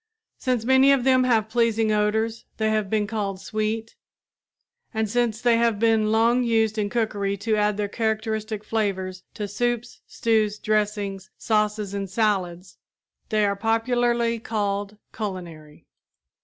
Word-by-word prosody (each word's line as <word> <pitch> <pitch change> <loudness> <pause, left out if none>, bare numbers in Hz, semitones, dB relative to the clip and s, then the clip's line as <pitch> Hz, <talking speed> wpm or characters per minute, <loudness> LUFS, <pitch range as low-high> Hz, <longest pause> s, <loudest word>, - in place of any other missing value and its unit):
Since 250 -4 -1
many 265 +2 +5
of 275 -3 +3
them 255 -1 +4
have 225 -4 +2
pleasing 225 -1 +1
odors 220 +2 0
they 220 0 +1
have 215 -2 0
been 215 0 +1
called 200 -3 -3
sweet, 215 +3 -3 1.0
and 220 0 0
since 230 0 0
they 240 -1 +3
have 230 -2 +2
been 220 -1 +2
long 230 +3 +3
used 225 -2 +1
in 205 -1 0
cookery 205 -3 -1
to 215 +2 0
add 210 -1 +1
their 205 -1 -1
characteristic 220 0 -2
flavors 190 -5 -2
to 210 -2 -3
soups, 240 +3 -2
stews, 215 -2 +1
dressings, 205 -3 -1
sauces 210 -2 0
and 200 -1 -3
salads, 185 -4 -1 0.5
they 215 -1 +2
are 200 0 +1
popularly 235 +2 +1
called 205 -2 -2 0.2
culinary. 170 -8 -7
215 Hz, 140 wpm, -24 LUFS, 205-230 Hz, 1.0 s, many